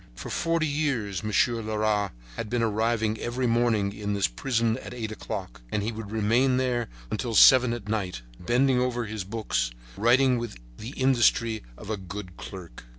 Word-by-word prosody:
For - - -7
forty 165 -2 +1
years 135 - -1
Monsieur 115 +2 +2
Leras 105 -2 0 0.3
had 105 - -4
been 120 0 0
arriving 110 0 0
every 125 +2 -2
morning 115 -4 +2
in 105 0 -3
this 100 - +2
prison 115 - 0
at - - -8
eight 110 -3 -4
o'clock, - - -6
and 105 - 0
he 110 - -1
would 110 -2 -7
remain 115 +5 +2
there 125 -3 0 0.2
until 115 -2 -2
seven 125 0 +8
at 120 -4 -5
night, 95 - -2 0.2
bending 125 +7 +2
over 120 -1 -1
his 110 -2 -4
books, 95 - -1 0.3
writing 125 +3 +4
with 120 -2 -5 0.2
the 115 +5 -7
industry 120 -3 +3 0.2
of 110 - -7
a 110 - -1
good 95 -1 -8
clerk. 90 -12 -10
110 Hz, 170 wpm, -27 LUFS, 105-120 Hz, 0.3 s, seven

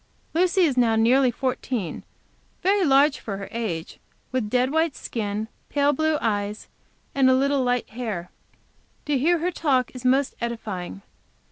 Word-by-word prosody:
Lucy 365 +3 +3
is 295 -7 +2
now 230 -2 +4
nearly 250 +4 +4
fourteen; 245 - -3 0.6
very 390 +1 +3
large 280 -1 +4
of - - -22
her 195 -2 -4
age, 195 -9 -4 0.3
with 255 -3 0
a - - -7
dead 250 +3 +2
white 320 -1 +1
skin, 215 -1 -3 0.2
pale 285 0 +2
blue 315 +2 +1
eyes, 205 -1 -2 0.5
and 265 -1 +4
a 260 - +5
little 275 +1 +2
light 245 -1 0
hair. 215 -7 -5 0.7
To 295 - 0
hear 325 +7 +3
her 345 +3 -1
talk 270 -7 +1
is 255 -1 -9
most 260 +2 +2
edifying. 205 -5 -5
255 Hz, 155 wpm, -24 LUFS, 220-285 Hz, 0.7 s, a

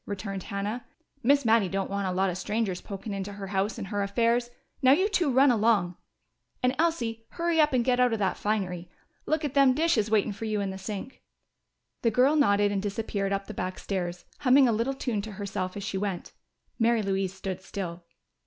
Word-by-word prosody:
returned 195 -1 -4
Hannah. 205 +6 -4 0.4
"Miss 280 +1 +3
Mattie 220 -4 +4
don't 195 +1 -1
want 200 -1 -1
a - - -1
lot 190 +1 +1
of 175 - -5
strangers 210 -3 -1
pokin' 200 +1 -6
into 195 +1 -4
her 200 -1 -7
house 195 +2 -1
and 195 - -6
her 205 -1 -1
affairs. 235 +4 +1 0.3
Now, 260 0 +7
you 375 +7 +3
two 355 -8 +1
run 265 +2 +5
along! 210 -6 +2 0.7
And, 250 +1 +2
Elsie, 235 -9 0
hurry 335 -2 +2
up 300 - +3
and 250 -3 +1
get 250 -1 +2
out 250 -1 +4
of 225 - 0
that 195 -3 0
finery. 180 -5 -2 0.4
Look 310 0 0
at 280 - -3
them 275 -3 +5
dishes 290 -9 +2
waitin' 215 -1 +2
fer 225 - -6
you 215 -1 -1
in 200 -1 -2
the 190 - -7
sink!" 205 +6 -6 0.8
The 230 - +3
girl 255 +6 +4
nodded 205 -8 +3
and 200 -1 -1
disappeared 200 -1 -2
up 195 0 -1
the 215 - -7
back 185 -1 -4
stairs, 180 -3 -4
humming 265 -1 +5
a - - +3
little 230 +5 0
tune 240 -6 -2
to 215 0 -7
herself 195 -1 -4
as 200 - -5
she 195 -1 -2
went. 195 -3 -4 0.5
Mary 230 -1 +3
Louise 195 -1 -1
stood 190 -1 -5
still. 180 -3 -6
210 Hz, 210 wpm, -27 LUFS, 195-245 Hz, 0.8 s, Now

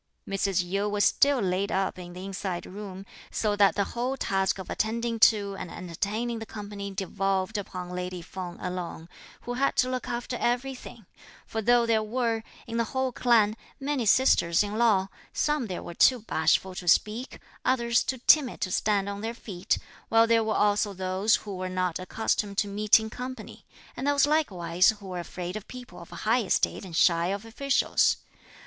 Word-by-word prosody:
Mrs. 195 -2 0
Yu 200 +3 -1
was 205 0 +2
still 280 -1 +4
laid 190 0 0
up 190 -1 -1
in 175 -1 -9
the 180 +1 -8
inside 190 -2 -4
room, 195 -1 -8 0.2
so 210 -2 0
that 200 -1 +4
the 200 - +2
whole 250 +3 -2
task 195 -4 0
of 190 - -7
attending 230 +1 -1
to 205 -3 +4
and - - -6
entertaining 210 +8 -3
the 225 - -6
company 205 -1 -6
devolved 195 +1 -1
upon 185 -3 -5
lady 180 -1 -5
Feng 180 -1 -7
alone, 180 -2 -5 0.3
who 245 - -5
had 270 +3 +1
to 255 - +2
look 255 0 -3
after 240 +1 -3
everything; 245 -2 -3 0.4
for 225 - -3
though 240 +2 +4
there 225 -1 +2
were, 230 0 -1 0.2
in 230 - -4
the 230 - +2
whole 260 0 +1
clan, 225 -4 +3 0.2
many 275 -4 -1
sisters 200 -8 +4
in 205 0 -4
law, 215 -5 +3 0.3
some 295 -5 0
there 185 - -5
were 170 - -7
too 250 +7 +4
bashful 185 -1 +1
to 180 -1 -7
speak, 220 +8 +2 0.3
others 235 -2 +2
too 260 - -2
timid 285 -6 +5
to 185 - -1
stand 200 0 +1
on 200 0 -4
their 225 +2 -4
feet; 190 -6 -2 0.3
while 225 0 +5
there 230 0 +3
were 220 -1 -1
also 205 0 +2
those 190 +3 +2
who 205 -2 -6
were 185 0 -4
not 185 -2 -1
accustomed 200 +1 -1
to 205 - +2
meeting 215 +2 +3
company; 255 +1 -8 0.3
and 265 - -3
those 285 -1 +4
likewise 185 - +2
who 195 -2 -10
were 180 -1 -4
afraid 180 +1 -6
of 215 -1 -7
people 250 -7 -10
of 170 - -12
high 230 +3 +1
estate 205 - 0
and 175 -3 -8
shy 170 0 +4
of 200 +3 -3
officials. 255 +3 +2
205 Hz, 180 wpm, -27 LUFS, 185-235 Hz, 0.4 s, timid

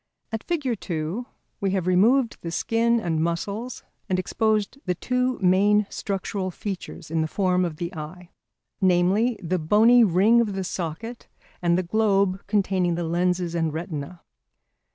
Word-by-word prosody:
At 225 -1 -4
Fig. 340 -4 -2 0.2
2 170 +8 -4 0.3
we 195 - 0
have 190 -2 -1
removed 225 +7 +3
the 170 - -5
skin 230 +6 +1
and 160 -6 -1
muscles 200 +9 -3 0.3
and 185 - +1
exposed 215 +5 0
the 180 - +1
two 250 +5 -1
main 200 +3 +4
structural 195 -1 -3
features 185 -4 -7
in 160 -1 +1
the 160 - 0
form 185 +1 +1
of 170 -3 -2
the 170 +2 -4
eye, 170 +3 -8 0.5
namely 190 +6 +2
the 180 +2 -1
bony 220 +9 +5
ring 210 +5 +4
of 215 -4 -1
the 190 - -2
socket 185 +7 -5 0.3
and 170 0 +2
the 185 - 0
globe 195 -1 +1
containing 190 -4 +1
the 175 - -2
lenses 175 +1 0
and 165 -2 -1
retina. 160 0 -6
185 Hz, 155 wpm, -24 LUFS, 170-215 Hz, 0.5 s, bony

